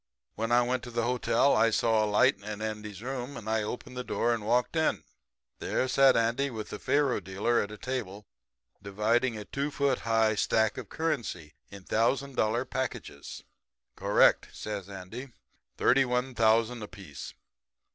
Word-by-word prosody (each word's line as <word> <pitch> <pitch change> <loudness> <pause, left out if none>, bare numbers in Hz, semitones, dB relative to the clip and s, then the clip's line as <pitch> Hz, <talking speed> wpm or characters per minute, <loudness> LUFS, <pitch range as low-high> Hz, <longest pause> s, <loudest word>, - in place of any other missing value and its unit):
When 115 +2 -3
I 120 +1 +5
went 125 +1 -1
to - - -7
the 120 -1 -1
hotel 125 +2 +2
I 115 +1 +4
saw 110 0 +2
a 105 - 0
light 105 -1 +4
in 105 +1 -6
Andy's 105 -1 -5
room, 130 +1 -5
and 110 - -9
I 110 0 +1
opened 120 +4 -6
the 125 - -4
door 120 -1 0
and 115 -2 -3
walked 120 +7 +1
in. 160 -1 +1 0.6
"There 130 - -1
sat 135 0 +5
Andy 115 +4 +1
and 120 -5 -7
the 105 -1 -6
faro 140 -5 +1
dealer 100 +5 0
at 100 - -4
a 105 - -9
table 105 -4 -5 0.6
dividing 110 +4 0
a 105 - -7
two 140 +1 -2
foot 140 -3 0
high 115 -1 +2
stack 110 +2 +1
of 120 - -9
currency 120 - -3 0.2
in 100 -1 -11
thousand 130 +7 0
dollar 115 +3 +1
packages. 130 -2 -5 0.5
"'Correct,' - - +3
says 100 -2 -6
Andy. 100 +7 -8 0.4
'Thirty 135 +2 +4
one 125 +1 -1
thousand 115 +1 +2
apiece. 95 -8 -9
115 Hz, 165 wpm, -29 LUFS, 105-125 Hz, 0.6 s, I